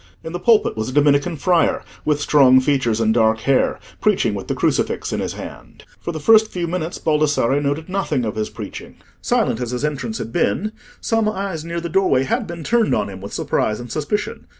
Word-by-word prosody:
In 160 Hz, -, -7 dB
the 175 Hz, -, -3 dB
pulpit 225 Hz, +2 st, +3 dB
was 110 Hz, +2 st, -3 dB
a -, -, -6 dB
Dominican 145 Hz, +3 st, +3 dB
friar, 175 Hz, +2 st, +2 dB, 0.2 s
with 150 Hz, -1 st, +1 dB
strong 135 Hz, -3 st, +5 dB
features 130 Hz, -5 st, +1 dB
and 110 Hz, -1 st, +2 dB
dark 110 Hz, -1 st, +2 dB
hair, 135 Hz, +2 st, +1 dB, 0.2 s
preaching -, -, +2 dB
with -, -, -6 dB
the -, -, -2 dB
crucifix -, -, 0 dB
in -, -, -1 dB
his -, -, -3 dB
hand. -, -, -10 dB, 0.2 s
For -, -, -4 dB
the 160 Hz, -, -5 dB
first 220 Hz, +7 st, +5 dB
few 175 Hz, -2 st, -3 dB
minutes 170 Hz, 0 st, -3 dB
Baldassarre 150 Hz, -3 st, +1 dB
noted 145 Hz, +3 st, -2 dB
nothing 185 Hz, -10 st, -1 dB
of 105 Hz, -, -2 dB
his 110 Hz, 0 st, -2 dB
preaching. -, -, -9 dB, 0.3 s
Silent 115 Hz, -, 0 dB
as 120 Hz, -, -3 dB
his 125 Hz, +4 st, -2 dB
entrance 150 Hz, +10 st, -3 dB
had 115 Hz, -, -6 dB
been, 200 Hz, -, 0 dB, 0.3 s
some 225 Hz, -2 st, +1 dB
eyes 195 Hz, -6 st, -4 dB
near 170 Hz, +1 st, -4 dB
the 170 Hz, -, -4 dB
doorway 165 Hz, -7 st, +2 dB
had 230 Hz, -, -1 dB
been 170 Hz, -2 st, -7 dB
turned 230 Hz, +4 st, +2 dB
on 100 Hz, -, -1 dB
him 95 Hz, -1 st, -9 dB
with 100 Hz, -, -8 dB
surprise 105 Hz, 0 st, -1 dB
and 120 Hz, -1 st, -8 dB
suspicion. 160 Hz, +8 st, -3 dB
150 Hz, 210 wpm, -20 LUFS, 125-180 Hz, 0.3 s, strong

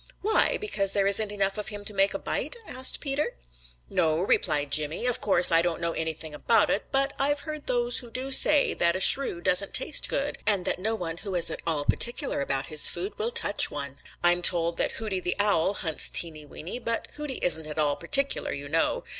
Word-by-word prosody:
"Why? 435 Hz, +3 st, +3 dB
Because 200 Hz, -, -3 dB
there 200 Hz, -1 st, 0 dB
isn't 205 Hz, +1 st, 0 dB
enough 200 Hz, 0 st, -2 dB
of 210 Hz, -, -7 dB
him 205 Hz, -1 st, -8 dB
to 210 Hz, -, -5 dB
make 195 Hz, 0 st, 0 dB
a -, -, -1 dB
bite?" -, -, -4 dB
asked 260 Hz, +1 st, -2 dB
Peter. 280 Hz, +1 st, -3 dB, 0.5 s
"No," 155 Hz, -, -1 dB
replied 145 Hz, -5 st, -1 dB
Jimmy. 155 Hz, -, 0 dB
"Of 245 Hz, -1 st, 0 dB
course 180 Hz, -4 st, +6 dB
I 165 Hz, 0 st, +5 dB
don't 170 Hz, -1 st, -3 dB
know 170 Hz, 0 st, -3 dB
anything 160 Hz, -1 st, -6 dB
about 215 Hz, +8 st, +2 dB
it, 205 Hz, -, -2 dB
but 275 Hz, 0 st, 0 dB
I've 285 Hz, +1 st, 0 dB
heard 305 Hz, -2 st, -9 dB
those 245 Hz, -1 st, +1 dB
who 240 Hz, -, -12 dB
do 260 Hz, +3 st, -6 dB
say 295 Hz, +2 st, +5 dB
that 170 Hz, 0 st, 0 dB
a -, -, -3 dB
Shrew 190 Hz, -4 st, +4 dB
doesn't 185 Hz, +3 st, +2 dB
taste 300 Hz, -, +2 dB
good, 280 Hz, +1 st, -3 dB
and 200 Hz, -4 st, +1 dB
that -, -, -2 dB
no 220 Hz, +4 st, -1 dB
one 170 Hz, -5 st, -6 dB
who 195 Hz, 0 st, -7 dB
is 175 Hz, -, -1 dB
at -, -, -7 dB
all 150 Hz, -3 st, -1 dB
particular 240 Hz, -, 0 dB
about 135 Hz, -1 st, -2 dB
his 155 Hz, -1 st, +6 dB
food 180 Hz, +4 st, -4 dB
will 220 Hz, +2 st, -1 dB
touch 205 Hz, -3 st, +2 dB
one. 140 Hz, -2 st, -6 dB, 0.2 s
I 175 Hz, -, +6 dB
am 175 Hz, 0 st, -1 dB
told 170 Hz, -1 st, +3 dB
that -, -, -2 dB
Hooty 210 Hz, -4 st, -4 dB
the 180 Hz, -1 st, -3 dB
Owl 200 Hz, -2 st, +1 dB
hunts 160 Hz, -6 st, +1 dB
Teeny 155 Hz, -3 st, 0 dB
Weeny, 170 Hz, +10 st, -9 dB
but 230 Hz, -1 st, -3 dB
Hooty 295 Hz, -3 st, -7 dB
isn't 160 Hz, -3 st, +2 dB
at 150 Hz, -, -9 dB
all 150 Hz, -2 st, 0 dB
particular, 275 Hz, -2 st, -1 dB
you 140 Hz, 0 st, -7 dB
know. 165 Hz, +3 st, -1 dB
195 Hz, 220 wpm, -25 LUFS, 165-240 Hz, 0.5 s, course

